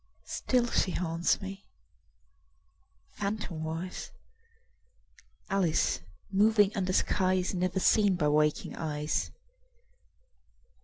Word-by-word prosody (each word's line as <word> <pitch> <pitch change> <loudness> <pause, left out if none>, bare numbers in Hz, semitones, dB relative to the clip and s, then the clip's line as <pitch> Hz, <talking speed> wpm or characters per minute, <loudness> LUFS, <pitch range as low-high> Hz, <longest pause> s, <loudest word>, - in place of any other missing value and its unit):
Still 250 -2 0
she - - +2
haunts 165 -1 0
me, 195 +1 -8 1.5
phantomwise, 180 -4 -4 1.4
Alice 190 - +1 0.3
moving 205 +1 +4
under 185 -2 0
skies 185 0 +1
Never 185 +1 0
seen 205 0 +4
by 150 -4 +1
waking 150 0 +1
eyes. 150 -1 -2
185 Hz, 80 wpm, -30 LUFS, 165-200 Hz, 1.5 s, moving